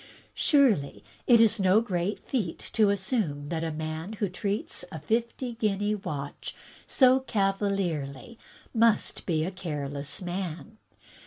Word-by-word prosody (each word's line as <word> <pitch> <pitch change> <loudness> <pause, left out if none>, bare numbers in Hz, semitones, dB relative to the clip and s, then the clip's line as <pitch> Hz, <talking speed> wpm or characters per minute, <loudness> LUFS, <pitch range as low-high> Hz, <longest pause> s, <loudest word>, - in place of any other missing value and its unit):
Surely 210 - +2 0.2
it 235 - +7
is 225 -1 +4
no 190 +2 +5
great 195 -3 -1
feat 210 -11 -3
to 215 -3 +4
assume 190 - -1
that 165 -1 -2
a 165 - -1
man 155 +5 -4
who 210 -1 -1
treats 200 +3 -3
a 160 - -5
fifty 235 - -1
guinea 210 -2 0
watch 150 -9 -5 0.3
so 260 -1 +5
cavalierly 195 - -1 0.3
must 230 -1 +2
be 160 -3 +1
a 185 - -3
careless 145 -6 -5
man. 180 +3 -5
195 Hz, 130 wpm, -28 LUFS, 160-220 Hz, 0.3 s, it